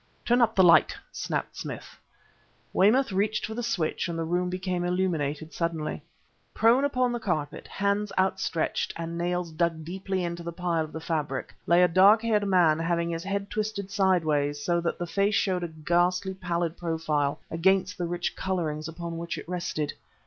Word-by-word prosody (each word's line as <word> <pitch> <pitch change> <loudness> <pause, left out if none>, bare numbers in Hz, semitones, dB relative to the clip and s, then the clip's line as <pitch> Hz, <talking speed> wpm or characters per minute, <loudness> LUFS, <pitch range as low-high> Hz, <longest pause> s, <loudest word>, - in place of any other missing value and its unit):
"Turn 245 +1 +3
up 225 -1 +3
the 190 - +6
light!" 165 -4 +6
snapped - - -3
Smith. - - -7 0.7
Weymouth 230 +6 +4
reached 205 +3 0
for 220 - -5
the 240 - -3
switch, 185 -8 -1
and 170 -1 -4
the 165 - -1
room 175 +2 0
became 185 -1 -2
illuminated 160 -4 -1
suddenly. 165 -3 -2 0.5
Prone 235 +5 +4
upon 255 -3 +1
the 240 - -2
carpet, 155 -9 -3
hands 200 +1 -1
outstretched 190 -3 0
and 165 0 -5
nails 175 0 -2
dug 160 -1 -1
deeply 190 +2 -3
into 170 0 -3
the 170 0 -5
pile 170 -1 -1
of 155 - -8
the 160 - -5
fabric, 150 -5 -3
lay 175 +1 +5
a - - +6
dark 195 +6 +6
haired 210 -3 +1
man 170 -5 +4
having 170 0 0
his 165 0 -3
head 200 0 -3
twisted 210 -2 -3
sideways 155 -8 +2
so 170 -1 +2
that 170 - -2
the 175 - -3
face 200 +4 +1
showed 185 -3 +1
a - - -1
ghastly 175 +4 0
pallid 175 -3 -2
profile 160 -4 -1
against 190 +3 +2
the 175 - -1
rich 175 +1 -2
colorings 160 -5 -2
upon 165 0 -6
which 170 0 -4
it - - -8
rested. 175 -4 -2
175 Hz, 180 wpm, -27 LUFS, 165-195 Hz, 0.7 s, the